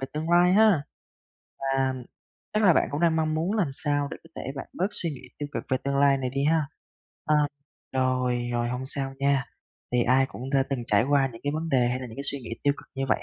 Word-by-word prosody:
về 135 - -3
tương 155 +2 -3
lai 175 +1 +5
ha, 205 -7 +5 0.8
và 135 -1 0 0.6
chắc 215 +1 +1
là 185 - +7
bạn - - +2
cũng 145 - -2
đang 165 -2 +3
mong 155 -1 +1
muốn 165 +5 0
làm 175 -10 +1
sao 145 0 -1
để - - -5
có - - -15
thể 135 - -4
bạn - - -5
bớt 185 - 0
suy 170 - -2
nghĩ 135 - -8 0.2
tiêu 145 -1 -4
cực - - -3
về 130 - +3
tương 140 0 0
lai 140 0 +5
này 130 -1 -2
đi 135 +2 -1
ha. 160 +1 +3 0.6
Ờ, 150 - +3 0.6
rồi, 125 -2 +1
rồi, 120 0 0
hông 125 +2 -3
sao 135 0 -3
nha, 140 -1 +2 0.5
thì 125 - +3
ai 130 +2 +4
cũng 125 +6 -7
đã 135 -1 +3
từng 130 -3 -1
trải 105 +2 +3
qua 140 -2 +4
những 115 - -11
cái 145 - 0
vấn 165 +1 -2
đề 125 -4 +3
hay 125 +1 -1
là 130 - -5
những 110 - -11
cái 140 - -4
suy 140 - -4
nghĩ 120 - -9
tiêu 145 - +4
cực - - -13
như 135 -1 -2
vậy - - +1
140 Hz, 255 wpm, -26 LUFS, 130-155 Hz, 0.8 s, là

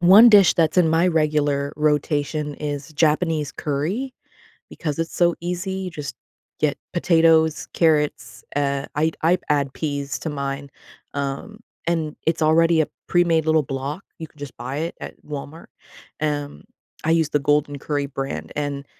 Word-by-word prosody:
one 195 +7 +9
dish 205 -4 +7
that's 160 -1 +2
in 175 -3 +5
my 165 +3 +3
regular 150 -3 +1
rotation 150 0 0
is 145 0 -5
Japanese 155 -1 +1
curry 175 - -2 0.6
because 150 -2 -4
it's 165 0 -3
so 175 -1 +3
easy; 180 +2 -3
you 190 -1 -4
just 150 -3 -6 0.4
get 150 -2 0 0.2
potatoes, 165 -2 +3
carrots, 155 -3 +1
uh, 140 -1 0
I'd 160 +2 0
I'd 175 +3 +3
add 140 -2 +1
peas 140 -3 -3
to 160 - -3
mine, 140 0 -4 0.4
um, 140 +10 -4 0.3
and 160 -3 -1
it's 165 - +1
already 165 +1 +4
a 155 - +1 0.2
premade 170 -3 +3
little 160 -1 +3
block. 135 +6 -4 0.2
You 160 - -6
can 150 - -26
just 145 -2 -8
buy 130 +3 -5
it 165 +2 -3
at - - -9
Walmart. 150 +2 -7 0.6
Um, 145 -1 -2 0.4
I 160 - +1
use 165 -2 +3
the 150 - +1
Golden 145 0 +1
Curry 145 0 -2
brand, 135 - -5
and 140 -1 -3
150 Hz, 155 wpm, -22 LUFS, 145-165 Hz, 0.6 s, one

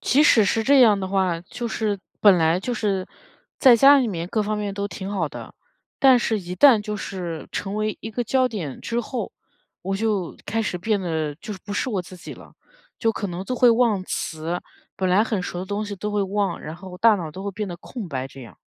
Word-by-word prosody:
即 275 +5 +3
使 230 -8 +6
是 225 +3 +1
这 275 +2 +5
样 215 -5 +6
的 190 - -3
话， 185 -3 +1
就 235 +6 -6
是 210 -3 -1 0.2
本 200 -4 +6
来 165 +2 +3
就 245 +6 -3
是 200 -5 -1 0.5
在 250 -4 +7
家 280 +4 +7
里 250 -4 +1
面 170 -3 -4
各 215 +1 0
方 210 +1 -2
面 205 -1 -3
都 200 +1 -3
挺 195 0 -6
好 180 -7 -1
的， - - -10 0.4
但 260 -2 +6
是 225 -2 0
一 180 0 -6
旦 265 -7 +7
就 210 0 -4
是 175 -5 -5
成 195 +1 -3
为 215 0 -1
一 220 - -6
个 240 +2 -2
焦 255 +2 +2
点 170 - -6
之 235 +1 -2
后， 235 -2 -4 0.5
我 195 +2 -2
就 205 -5 -1
开 225 +1 -1
始 180 -3 -3
变 210 +3 0
得 160 -4 -2
就 210 +5 -7
是 190 - -8
不 205 - -6
是 255 - -1
我 200 - -1
自 180 +1 -12
己 - - -9
了， - - -15 0.5
就 225 -1 +1
可 205 - -3
能 180 +1 -5
就 255 - -3
会 245 -1 +5
忘 225 -5 +2
词， 165 +1 -3 0.4
本 185 -1 0
来 185 +4 +4
很 210 -5 -2
熟 175 - -5
的 185 - -5
东 205 +2 -2
西 205 - -5
都 210 +3 -4
会 205 -1 0
忘， 200 +1 -1
然 155 +2 -7
后 185 0 -10
大 225 -2 +5
脑 165 -4 -5
都 190 +4 -8
会 200 - -2
变 205 0 -4
得 175 - -6
空 205 +1 -8
白 130 -2 -3
这 135 0 -13
样。 115 - -13
205 Hz, 260 characters per minute, -23 LUFS, 180-225 Hz, 0.5 s, 在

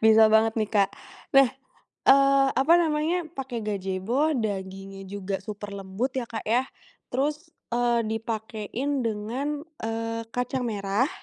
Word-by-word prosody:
Bisa 220 0 +7
banget 220 0 +5
nih, 215 -1 0
Kak. 200 -3 +4 0.5
Nah, 275 -1 +8 0.6
eee, 275 0 +6
apa 275 +5 +4
namanya, 325 +2 +1
pake 260 -6 -5
Gajebo 210 +9 0
dagingnya 195 -2 -4
juga 200 0 -3
super 205 0 -7
lembut 200 +6 -3
ya 245 - -4
Kak, 225 - -5
ya. 235 +4 +3 0.5
Terus, 295 +6 -1 0.2
eee, 240 -1 +2
dipakein 225 +4 -3
dengan, 245 +7 -2 0.2
eee, 225 0 -2
kacang 250 +1 -1
merah 205 +5 0
225 Hz, 130 wpm, -26 LUFS, 205-270 Hz, 0.6 s, Nah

